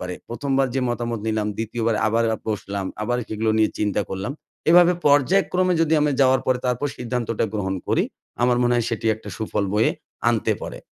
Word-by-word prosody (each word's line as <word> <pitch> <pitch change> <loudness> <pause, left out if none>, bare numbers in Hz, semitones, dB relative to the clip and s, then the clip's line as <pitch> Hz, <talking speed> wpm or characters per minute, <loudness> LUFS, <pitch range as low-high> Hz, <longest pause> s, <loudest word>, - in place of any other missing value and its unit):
পারে। 90 0 -4
১ম 135 +4 -4
বার 135 - +3
যে 135 - +1
মতামত 120 -2 -3
নিলাম, 110 -1 0
২য় 115 +1 -3
বার 115 -2 +2
আবার 115 +1 +2 0.2
বসলাম, 100 -2 -3 0.2
আবার 120 +3 0
সেগুলো 110 +1 0
নিয়ে 110 - +3
চিন্তা 105 -1 0
করলাম। 95 +7 -3 0.4
এভাবে 175 +1 +7
পর্যায়ক্রমে 180 +5 +3
যদি 160 0 +2
আমি 150 0 +2
যাওয়ার 130 -1 +4
পরে 130 -1 +2
তারপর 125 +3 0
সিদ্ধান্তটা 120 -2 -2
গ্রহণ 95 -2 -1
করি, - - +2 0.4
আমার 125 0 +3
মনে 120 0 +3
হয় 120 -2 +1
সেটি 115 -1 -3
একটা 110 - -12
সুফল 110 -2 -2
বয়ে 110 +2 +3 0.4
আনতে 115 -2 +1
পরে। - - -6
115 Hz, 185 wpm, -23 LUFS, 110-130 Hz, 0.4 s, এভাবে